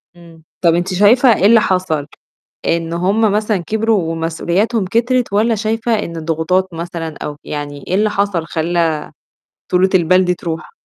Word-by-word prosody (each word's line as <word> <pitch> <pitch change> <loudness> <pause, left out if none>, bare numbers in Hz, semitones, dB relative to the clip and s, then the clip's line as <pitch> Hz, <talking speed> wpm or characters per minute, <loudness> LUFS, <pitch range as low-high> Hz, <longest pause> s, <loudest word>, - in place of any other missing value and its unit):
إمم، 165 -2 -17 0.2
طَب 170 -2 +4
أنتِ 180 +2 -1
شايفة 230 +6 +5
إيه 195 - +1
اللي 225 +1 +6
حصل؟ 170 -6 -1 0.6
إن 165 0 -1
هم 200 +5 +1
مثلًا 210 -1 0
كبروا 210 -2 0
ومسؤولياتهم 175 +6 -1
كترت 235 +2 0
والّا 220 +2 +2
شايفة 225 +2 -1
إن 170 -4 -5
الضغوطات 165 +4 0
مثلًا 165 -2 -5
أو 150 0 -6
يعني 145 -1 -6
إيه 185 - 0
اللي 210 +1 +2
حصل 200 -5 -1
خلّى 165 -1 0 0.7
طولة 185 +1 +3
البال 185 +1 +4
دي 180 0 +1
تروح؟ 165 -2 -6
180 Hz, 155 wpm, -16 LUFS, 165-210 Hz, 0.7 s, اللي